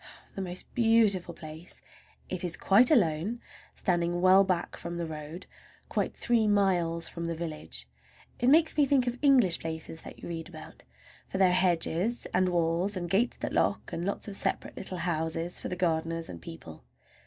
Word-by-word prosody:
The 195 Hz, -, -5 dB
most 180 Hz, -1 st, -5 dB
beautiful 220 Hz, -7 st, +3 dB
place! 160 Hz, +2 st, -9 dB, 0.5 s
It 185 Hz, -1 st, -3 dB
is 175 Hz, -1 st, -1 dB
quite 230 Hz, +6 st, +6 dB
alone, 205 Hz, -, +2 dB, 0.4 s
standing 175 Hz, -2 st, 0 dB
well 185 Hz, +2 st, +6 dB
back 185 Hz, -3 st, -1 dB
from 170 Hz, 0 st, -6 dB
the 170 Hz, -, -2 dB
road, 155 Hz, +2 st, -8 dB, 0.4 s
quite -, -, -2 dB
three 230 Hz, -2 st, +2 dB
miles 180 Hz, -5 st, +2 dB
from 170 Hz, -1 st, -5 dB
the 170 Hz, -, -2 dB
village. 150 Hz, -, -6 dB, 0.5 s
It 245 Hz, -, +3 dB
makes 315 Hz, +2 st, +4 dB
me 290 Hz, -2 st, +4 dB
think 265 Hz, -2 st, +3 dB
of 245 Hz, 0 st, -3 dB
English 255 Hz, -, +4 dB
places 160 Hz, 0 st, -5 dB
that -, -, -11 dB
you -, -, -9 dB
read 165 Hz, -1 st, -6 dB
about, -, -, -12 dB, 0.4 s
for -, -, -4 dB
there 190 Hz, -1 st, +5 dB
are -, -, +1 dB
hedges 180 Hz, +4 st, +1 dB
and 185 Hz, 0 st, +3 dB
walls 175 Hz, +3 st, 0 dB
and 175 Hz, -1 st, -4 dB
gates 230 Hz, +5 st, +1 dB
that -, -, -4 dB
lock, -, -, 0 dB
and 170 Hz, -, -3 dB
lots 200 Hz, +3 st, -2 dB
of 200 Hz, -, -3 dB
separate -, -, 0 dB
little 185 Hz, -1 st, -6 dB
houses 165 Hz, 0 st, -2 dB
for -, -, -5 dB
the 180 Hz, -, -3 dB
gardeners 165 Hz, -2 st, -1 dB
and 85 Hz, -, -8 dB
people. 80 Hz, -3 st, -10 dB
175 Hz, 180 wpm, -29 LUFS, 165-200 Hz, 0.5 s, quite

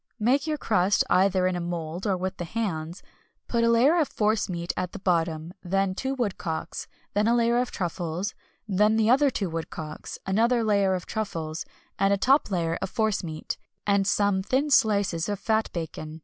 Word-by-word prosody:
Make 265 Hz, +7 st, +2 dB
your 305 Hz, -1 st, 0 dB
crust, 205 Hz, -6 st, +2 dB
either 185 Hz, 0 st, +4 dB
in 185 Hz, 0 st, +1 dB
a -, -, -2 dB
mould, 170 Hz, +2 st, -4 dB
or 190 Hz, -2 st, +1 dB
with 185 Hz, +1 st, -3 dB
the -, -, -4 dB
hands, 170 Hz, -4 st, -3 dB, 0.4 s
put 235 Hz, -1 st, +1 dB
a 230 Hz, -, +4 dB
layer 260 Hz, +9 st, +5 dB
of 305 Hz, -, +2 dB
force 215 Hz, -1 st, 0 dB
meat 170 Hz, -1 st, -3 dB
at 180 Hz, -1 st, -3 dB
the -, -, -5 dB
bottom, 165 Hz, -3 st, 0 dB
then 195 Hz, +1 st, 0 dB
two 265 Hz, +7 st, -2 dB
woodcocks, 195 Hz, -9 st, -3 dB, 0.3 s
then 210 Hz, +1 st, +2 dB
a 235 Hz, -, +4 dB
layer 235 Hz, 0 st, +3 dB
of 250 Hz, 0 st, 0 dB
truffles, 175 Hz, +1 st, -3 dB, 0.3 s
then 210 Hz, +2 st, +3 dB
the 220 Hz, +1 st, +3 dB
other 280 Hz, +2 st, +5 dB
two 205 Hz, -6 st, -2 dB
woodcocks, 160 Hz, -2 st, -6 dB
another 230 Hz, +5 st, +2 dB
layer 200 Hz, -3 st, +2 dB
of 180 Hz, -, -5 dB
truffles, 165 Hz, -7 st, -4 dB, 0.3 s
and 195 Hz, 0 st, +3 dB
a 200 Hz, -, +3 dB
top 265 Hz, +8 st, +3 dB
layer 170 Hz, -4 st, -1 dB
of -, -, -2 dB
force 220 Hz, -2 st, 0 dB
meat, 155 Hz, -2 st, -5 dB, 0.3 s
and 200 Hz, -1 st, +2 dB
some 200 Hz, -2 st, +2 dB
thin 265 Hz, +9 st, 0 dB
slices 200 Hz, -9 st, +3 dB
of 205 Hz, -, -1 dB
fat 220 Hz, +2 st, +1 dB
bacon. 160 Hz, -2 st, -6 dB
195 Hz, 190 wpm, -26 LUFS, 175-225 Hz, 0.4 s, layer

